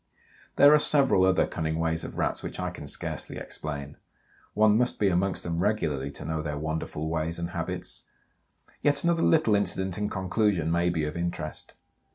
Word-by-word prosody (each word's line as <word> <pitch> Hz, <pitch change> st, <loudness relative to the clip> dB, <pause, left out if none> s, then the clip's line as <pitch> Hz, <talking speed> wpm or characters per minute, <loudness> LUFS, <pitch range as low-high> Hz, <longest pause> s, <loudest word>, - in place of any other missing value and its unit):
There 145 Hz, +1 st, +7 dB
are 150 Hz, -, +6 dB
several 140 Hz, -10 st, +4 dB
other 95 Hz, -1 st, +3 dB
cunning 80 Hz, -1 st, -3 dB
ways 80 Hz, 0 st, -1 dB
of -, -, -7 dB
Rats -, -, -1 dB
which -, -, -7 dB
I -, -, -2 dB
can -, -, -9 dB
scarcely -, -, -3 dB
explain. 75 Hz, -1 st, -6 dB, 0.6 s
One 105 Hz, 0 st, +5 dB
must 125 Hz, +2 st, +1 dB
be 100 Hz, -, +3 dB
amongst 95 Hz, +1 st, 0 dB
them 85 Hz, -1 st, -2 dB
regularly 80 Hz, -9 st, 0 dB
to -, -, -9 dB
know 80 Hz, -1 st, -2 dB
their 75 Hz, -1 st, -4 dB
wonderful 80 Hz, 0 st, -3 dB
ways 80 Hz, +1 st, -2 dB
and 85 Hz, 0 st, -4 dB
habits. 85 Hz, -3 st, -2 dB, 0.8 s
Yet 145 Hz, -1 st, +2 dB
another 170 Hz, -1 st, +2 dB
little 155 Hz, -9 st, +3 dB
incident, 95 Hz, -1 st, 0 dB
in 105 Hz, -, -1 dB
conclusion, 95 Hz, -3 st, 0 dB
may 85 Hz, +1 st, +2 dB
be 80 Hz, -3 st, -1 dB
of 75 Hz, 0 st, -3 dB
interest. 85 Hz, -3 st, -4 dB
85 Hz, 180 wpm, -27 LUFS, 80-105 Hz, 0.8 s, There